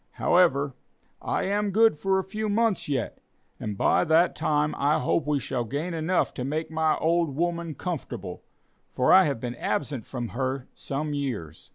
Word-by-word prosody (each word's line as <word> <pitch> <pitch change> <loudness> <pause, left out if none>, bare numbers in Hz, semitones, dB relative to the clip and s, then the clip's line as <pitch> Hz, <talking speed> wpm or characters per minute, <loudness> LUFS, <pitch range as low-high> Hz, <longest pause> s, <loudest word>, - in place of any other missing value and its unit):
However, 140 -6 +3 0.5
I - - -1
am 205 +1 0
good 220 +1 +4
for 190 +5 +1
a 190 - 0
few 215 +3 -3
months 215 -5 +1
yet, 140 - -2 0.4
and 105 -2 -4
by - - +3
that 165 +2 +3
time 150 0 +1
I 145 +2 +3
hope 150 - 0
we 150 -1 +1
shall 130 -2 -2
gain 145 +9 -3
enough 165 +3 0
to 125 - -4
make 155 +5 -3
my 160 -1 +1
old 165 -3 +1
woman 170 -1 -2
comfortable, 175 0 -5 0.5
for 125 - +4
I 190 0 +8
have 140 -6 -1
been 120 0 -4
absent 130 -2 -3
from 120 -3 -4
her 130 +1 -3
some 150 +2 -4
years." 115 - -4
150 Hz, 175 wpm, -26 LUFS, 135-175 Hz, 0.5 s, I